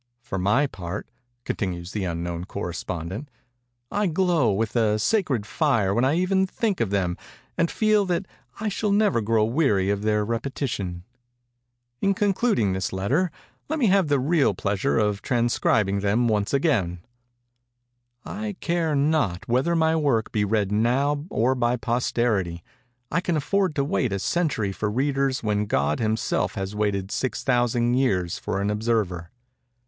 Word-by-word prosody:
For 95 -6 -4
my 105 +10 +3
part," 90 -5 -6 0.4
continues 90 -3 -3
the 105 -3 -2
unknown 85 0 -3
correspondent, 95 - -5 0.6
"I 205 -1 +1
glow 170 - +2
with 110 +4 -1
a 110 -2 +3
sacred 135 - +1
fire 115 - +1
when 120 +4 +2
I 135 +4 +3
even 190 +2 +2
think 205 - -1
of 115 - +1
them, 95 -3 0 0.4
and 170 0 +1
feel 215 -2 +2
that 180 +2 0 0.3
I 220 - -2
shall 210 0 -1
never 205 - +3
grow 110 0 +2
weary 110 -7 +2
of 100 0 -1
their 105 0 +1
repetition:—in 120 - -5
concluding 200 - +1
this 95 0 -2
letter, 130 - 0 0.4
let 315 - -1
me 270 - +2
have 190 -3 +3
the 145 -2 +2
real 140 - +2
pleasure 100 +3 0
of 105 -2 +1
transcribing 115 -4 +1
them 105 +5 +2
once 105 -2 0 1.7
again:—'_I 210 -1 -5
care 165 -3 0
not 140 - +1
whether 130 +8 +2
my 160 0 +3
work 140 -8 +1
be 105 - +1
read 105 -1 0
now 135 +7 +1
or 125 - +2
by 120 -1 +1
posterity. 115 -7 -1 0.5
I 175 - +1
can 175 -3 0
afford 185 +2 0
to 140 - +1
wait 130 -4 0
a 100 - 0
century 120 - 0
for 105 +2 -2
readers 135 +2 0
when 105 -1 0
God 70 -3 +1
himself 110 0 0
has 95 +1 -4
waited 100 -2 -1
six 130 - -2
thousand 120 -1 +2
years 95 -10 +1
for 100 - -2
an 100 +1 0
observer. 105 -6 -1
120 Hz, 150 wpm, -24 LUFS, 100-150 Hz, 1.7 s, my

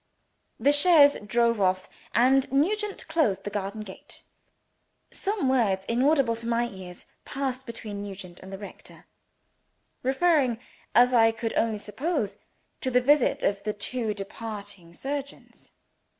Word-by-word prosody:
The 285 - +4
chaise 290 -1 +6
drove 235 0 +1
off; 185 0 +1 0.3
and 260 +3 +4
Nugent 400 +9 0
closed 260 - +1
the 205 - -5
garden 205 +1 -4
gate. 195 -3 -12 0.9
Some 395 -8 -2
words, 210 -8 +1
inaudible 255 +1 +2
to 230 0 -5
my 235 0 +1
ears, 185 -3 -11 0.2
passed 265 -1 -4
between 215 -3 -6
Nugent 190 -3 -9
and 190 - -11
the 195 - -6
rector 200 0 -12 1.0
referring, 265 -3 +2 0.4
as 245 +1 +6
I 225 -2 +5
could 225 0 -4
only 225 -2 +1
suppose, 215 - -3 0.4
to 260 - -1
the 250 0 +4
visit 280 +2 +3
of 200 0 0
the 210 0 -2
two 220 +1 -3
departing 200 -4 -8
surgeons. 280 +3 -7
230 Hz, 135 wpm, -26 LUFS, 205-270 Hz, 1.0 s, chaise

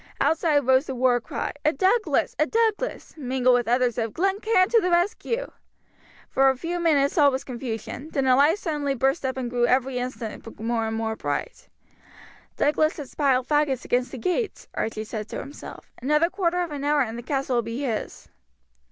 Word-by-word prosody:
Outside 295 -1 +2
rose 260 +3 +3
the 265 - -4
war 245 -1 +2
cry, - - -4
"A 305 - +4
Douglas! 380 - +1
A - - +3
Douglas!" 455 +1 -1
mingled 255 -2 +2
with 245 -1 +2
others 245 0 +1
of, 225 -2 -2
"Glen 390 +3 +1
Cairn 425 -4 +3
to 460 -1 +4
the 365 - 0
rescue!" 410 +7 0 0.8
For 270 0 +4
a 265 - 0
few 345 +5 -3
minutes 305 -2 +2
all 290 -1 +7
was 265 -1 -3
confusion, 245 +3 -6
then 275 -4 -1
a 255 -1 +5
light 295 +7 +4
suddenly 295 -7 -2
burst 270 +5 +1
up 265 0 -2
and 255 -2 -2
grew 240 0 +1
every 255 0 +1
instant 235 -3 -6
more 225 0 -1
and 220 0 -3
more 225 0 -2
bright. - - -4 0.9
"Douglas 310 +2 +2
has 285 -4 -8
piled 265 -3 +1
faggots 295 -4 +1
against 245 0 0
the 265 - -6
gates," 365 - -2
Archie 220 -1 -3
said 215 -1 -6
to 230 - -5
himself. 285 - -9
"Another 300 +6 +2
quarter 360 -2 0
of 340 - -6
an 285 -1 -5
hour 290 0 +2
and 225 -2 -5
the 240 - -6
castle 270 0 -1
will - - +3
be 230 +3 -5
his." 230 -6 -4
270 Hz, 195 wpm, -25 LUFS, 245-320 Hz, 0.9 s, all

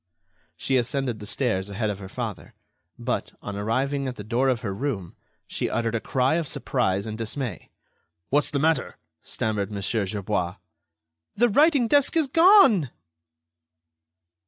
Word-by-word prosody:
She 135 - +1
ascended 125 -2 -1
the 105 - -8
stairs 105 -6 -1
ahead 105 +1 -1
of 100 - -7
her 95 -1 -9
father, 110 -4 -6 0.4
but, - - -3
on 105 - -6
arriving 130 +7 -1
at 125 - -4
the 105 - -8
door 120 +5 +1
of 125 -2 0
her 100 -6 -3
room, 100 -7 -4 0.3
she - - -3
uttered 115 0 -1
a 115 - 0
cry 130 +8 +1
of 165 -3 -2
surprise 100 -8 -1
and 110 -1 -5
dismay. 115 - -4 0.6
"What's 145 +1 +3
the 145 - -2
matter?" 160 +3 +1 0.2
stammered 105 -2 -2
Mon. 100 -1 -5
Gerbois. 100 -4 -1 0.8
"The 240 +3 +3
writing 285 +1 +4
desk 285 +6 +3
is 320 - +4
gone!" 325 - +6
120 Hz, 150 wpm, -25 LUFS, 105-145 Hz, 0.8 s, gone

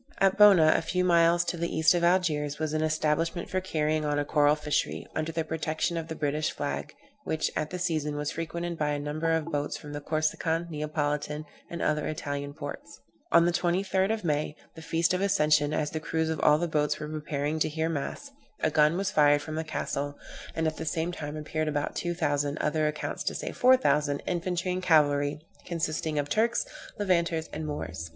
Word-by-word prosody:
At 195 -1 +3
Bona, 190 -7 +7
a - - +2
few 180 +3 0
miles 170 0 +4
to 175 - -2
the 170 +1 -1
east 160 +2 +5
of 175 -1 0
Algiers, 155 -5 +2
was 155 -1 -2
an 155 - 0
establishment 155 +2 0
for 185 - 0
carrying 155 -3 0
on 145 -1 0
a 145 - 0
coral 145 0 +4
fishery, 150 -1 -1
under 155 +1 -1
the 165 0 -1
protection 160 +1 -2
of 165 -1 -3
the 160 - -5
British 150 0 0
flag, - - -4 0.3
which, 160 - -1
at 155 0 -1
the 180 - -4
season, 155 -4 -1
was 150 0 -2
frequented 170 +1 -4
by 150 -1 +1
a - - -1
great 145 - -5
number 155 +2 -1
of 160 0 0
boats 145 -1 -2
from 150 0 -9
the 145 - -5
Corsican, 160 +2 0
Neapolitan, 150 0 -2 0.2
and 170 - -4
other 150 -1 +1
Italian 145 -2 -4
ports. 145 -2 -8 0.3
On 170 0 +6
the 175 - +3
23d 190 +3 +1
of 220 -1 -2
May, 150 -2 -1 0.2
the 160 - -11
feast 165 +2 +1
of 185 - 0
Ascension, 150 -7 +3
as 150 -1 -1
the 160 - -3
crews 160 0 -1
of 160 - -3
all 150 - +5
the 170 +2 -1
boats 150 -2 0
were 150 - -5
preparing 150 0 -2
to - - +2
hear 160 +1 -1
mass, 165 - -4 0.3
a 155 - +2
gun 150 +2 +4
was 195 0 -1
fired 145 -2 +4
from 155 +1 -6
the 160 +1 -2
castle, 145 -2 -3 0.4
and 160 - 0
at 155 0 -1
the - - -4
same 165 +3 -1
time 150 -3 -6
appeared 155 +1 -2
about 145 -1 -2
two 175 0 -2
thousand, 145 -2 0
other 155 0 +1
accounts 150 0 -3
say - - -4
four 255 +1 +5
thousand, 145 - +1
infantry 180 +1 -1
and 180 +1 -2
cavalry, 145 -4 +3 0.3
consisting 160 -2 -2
of 145 -1 0
Turks, 225 +10 +1 0.3
Levanters, 170 -5 +1
and 155 0 -4
Moors. 85 - -5
155 Hz, 205 wpm, -28 LUFS, 150-170 Hz, 0.4 s, Bona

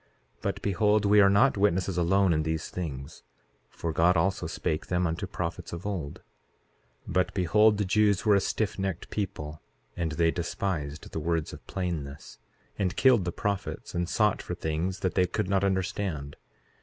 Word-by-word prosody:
But - - -3
behold, 105 +1 +2
we 105 +1 +6
are 100 - +6
not 100 +5 +4
witnesses 95 -2 +1
alone 90 +1 +3
in 80 - +1
these 80 0 -2
things; 75 -4 -6 0.5
for 85 -1 -4
God 85 +3 +4
also 95 +4 +1
spake 75 0 -2
them 90 0 +1
unto 85 +4 -2
prophets 90 -2 -5
of 85 +3 -6
old. 90 -9 -4 0.8
4:14 - - -5
But 90 0 +1
behold, 105 +4 +4
the 105 - 0
Jews 105 +2 +2
were 105 - +5
a - - +5
stiffnecked 95 -3 -2
people; 80 -7 -4 0.3
and 80 -3 -2
they 80 +1 +3
despised 85 -4 -3
the - - -3
words 80 -1 -1
of - - -12
plainness, 80 -7 -5 0.4
and 95 0 0
killed 125 -8 +4
the 85 - -1
prophets, 100 +2 -3
and 85 0 -1
sought 105 0 +2
for - - -5
things 80 +4 -2
that 95 - 0
they 90 -1 +3
could 90 - -2
not 100 0 +1
understand. 95 -6 -1
90 Hz, 170 wpm, -28 LUFS, 80-100 Hz, 0.8 s, we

